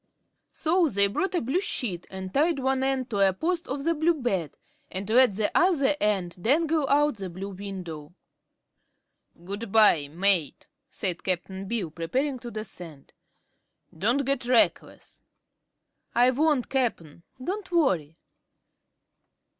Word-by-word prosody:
So 330 0 +1
they 200 -4 +4
brought 365 - -1
a - - +1
blue 270 +11 0
sheet 205 - -3
and 190 -1 -7
tied 310 +2 +2
one 265 0 0
end 265 -2 -1
to 205 - -1
a 195 -1 +4
post 335 - -2
of 275 +1 -4
the 335 +2 +2
blue 330 +2 +2
bed 195 - -2 0.3
and 190 +1 -5
let 235 -2 +5
the 210 0 -1
other 310 -6 +3
end 190 -4 -1
dangle 305 - +1
out 295 -3 +3
the 190 -2 -5
blue 190 +3 -7
window. 180 -6 -7 1.3
"Good 200 +3 -6
bye, 205 -10 +5
mate," 170 -1 0 0.2
said 190 -9 -3
Cap'n 190 +1 -3
Bill, 195 -7 -2
preparing 255 - -2
to 240 - -8
descend; 175 -9 -9 0.8
"don't 240 - +1
get 275 -2 -1
reckless." 245 -2 0 0.9
"I 245 +2 +5
won't, 290 -1 +1
Cap'n. 220 - -2 0.2
Don't 375 +8 -5
worry." 185 - +1
230 Hz, 135 wpm, -26 LUFS, 190-280 Hz, 1.3 s, let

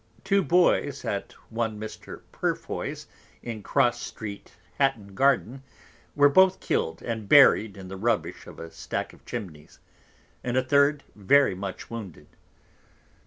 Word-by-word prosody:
Two 195 0 +2
Boys 170 -6 +2
at 100 - -3 0.2
one 110 -2 -2
Mr. 110 0 -9
Purefoy's, - - -3 0.4
in 115 -3 -6
Cross 120 0 +1
Street 105 -2 -8 0.2
Hatton 110 -8 0
Garden, 135 +1 +1 0.5
were 145 0 +6
both 190 +6 +5
kill'd, 80 0 -2
and 110 -4 -4
buried 110 -7 +6
in 95 -1 -9
the 95 +1 -7
Rubbish 115 +2 -1
of - - -11
a 80 0 -8
Stack - - -5
of - - -19
Chimneys; 90 -11 -8 0.7
and 125 +1 -1
a 130 - +3
third 140 +2 +3
very 135 +5 +4
much 95 +3 -7
wounded. 95 -10 -8
115 Hz, 135 wpm, -26 LUFS, 100-140 Hz, 0.7 s, were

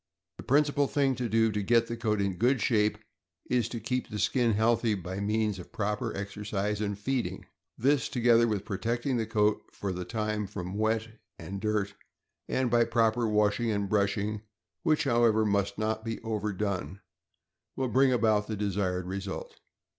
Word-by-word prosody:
The - - -9
principal 145 0 +3
thing 140 -2 +2
to 125 -2 -3
do 110 +1 +3
to 105 0 -1
get 115 +3 +3
the 115 - -4
coat 110 -3 0
in 100 -1 0
good 125 +5 +3
shape 105 -1 +2 0.5
is 120 -2 +2
to 120 - -4
keep 125 +4 -2
the 105 - -5
skin 115 +2 +2
healthy 115 +1 +2
by 95 0 -5
means 105 -1 0
of 90 - -11
proper 105 +2 -2
exercise 105 +1 -3
and 100 -1 -2
feeding; 130 +4 -2 0.3
this, 140 +3 +2
together 120 -1 +4
with 105 -4 -2
protecting 120 +6 -1
the 110 -2 -1
coat 105 -1 +2
for 100 - -4
the 90 0 -4
time 105 0 -2
from 90 -2 -6
wet 110 +2 0 0.3
and 100 0 -6
dirt, 105 -2 0 0.6
and 130 -2 0
by 120 -1 +5
proper 115 0 +2
washing 105 +2 +2
and 100 -2 -1
brushing, 105 +1 0 0.4
which, 155 -3 +2
however, 115 -4 +3
must 100 -1 0
not 110 0 -1
be 115 -1 -4
overdone, 100 -5 -3 0.7
will 130 - -1
bring 130 +3 +4
about 110 -4 +2
the 110 - -3
desired 95 -3 -1
result. 95 +1 -5
110 Hz, 170 wpm, -29 LUFS, 100-115 Hz, 0.7 s, by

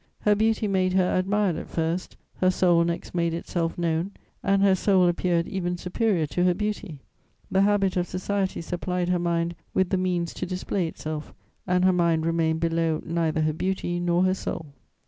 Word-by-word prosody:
Her 210 - +4
beauty 220 +1 +1
made 185 -2 +1
her 185 -1 +2
admired 190 -1 +1
at - - -7
first; 165 +2 -2 0.2
her 185 - +3
soul 175 -2 +3
next 170 0 -3
made 170 -1 0
itself 170 0 -2
known, 170 +3 -1 0.3
and 195 0 +2
her 195 -1 +5
soul 190 -1 +3
appeared 175 -1 +1
even 180 -2 -2
superior 180 -1 0
to 175 +4 -1
her 180 -1 +3
beauty. 210 -6 -3 0.5
The 190 - +3
habit 195 -2 +2
of 180 0 0
society 190 +1 -2
supplied 180 +1 -2
her 180 -1 +2
mind 170 0 0 0.2
with 190 -1 +2
the 190 - +2
means 180 -2 -1
to 180 - -4
display 185 0 -2
itself, 155 -1 -6 0.3
and 180 0 +2
her 185 - +5
mind 170 -2 +2
remained 165 -1 +1
below 165 -1 0
neither 165 -1 0
her 155 0 +1
beauty 175 +1 -2
nor 175 0 +2
her 185 0 +3
soul. 160 -5 -5
180 Hz, 185 wpm, -25 LUFS, 170-190 Hz, 0.5 s, her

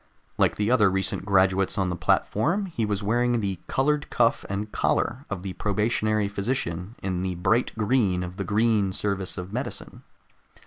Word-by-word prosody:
Like - - +3
the 105 +3 0
other 110 -6 +5
recent 95 +1 -1
graduates 95 -1 +2
on 95 -2 +1
the - - -2
platform, 165 - +1
he 120 - -2
was 105 0 -2
wearing 120 +3 +1
the 100 -4 -2
colored 145 +2 0
cuff 115 -1 +2
and 105 +2 -3
collar 130 +5 0
of 95 -3 -4
the 95 -2 -4
probationary 105 0 0
physician, 100 -2 -3
in 95 -2 -1
the 95 -1 -2
bright 115 +8 +1
green 105 -5 +1
of 90 +1 -7
the 100 - -2
Green 105 -1 +2
Service 100 -2 -2
of 90 +2 -6
Medicine. 125 +4 -5
105 Hz, 170 wpm, -25 LUFS, 95-115 Hz, -, other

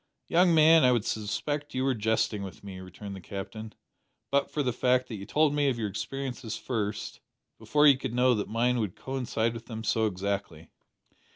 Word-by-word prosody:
"Young 175 0 +4
man, 160 +1 +7
I 125 - +6
would 120 -3 +1
suspect 145 +8 -3
you 130 - 0
were 135 0 +2
jesting 110 -2 0
with 95 0 -8
me," 95 -2 -8
returned 95 +2 -9
the 95 - -9
Captain, 105 +4 -7 0.6
"but 140 0 +2
for 150 - -1
the 125 -2 0
fact 125 +1 +2
that 110 - -5
you 100 +1 -9
told 150 +4 +3
me 145 -1 +2
of 125 - -1
your 110 -3 -2
experiences 125 +1 -5
first, 105 -4 -3 0.4
before 150 0 +3
you 140 -3 +7
could 120 - -4
know 125 0 +4
that 105 -3 -2
mine 120 +2 +1
would 105 -5 -2
coincide 125 -4 -2
with 115 0 -9
them 110 -2 -6
so 110 0 +2
exactly." 95 -4 -4
115 Hz, 195 wpm, -28 LUFS, 105-135 Hz, 0.6 s, man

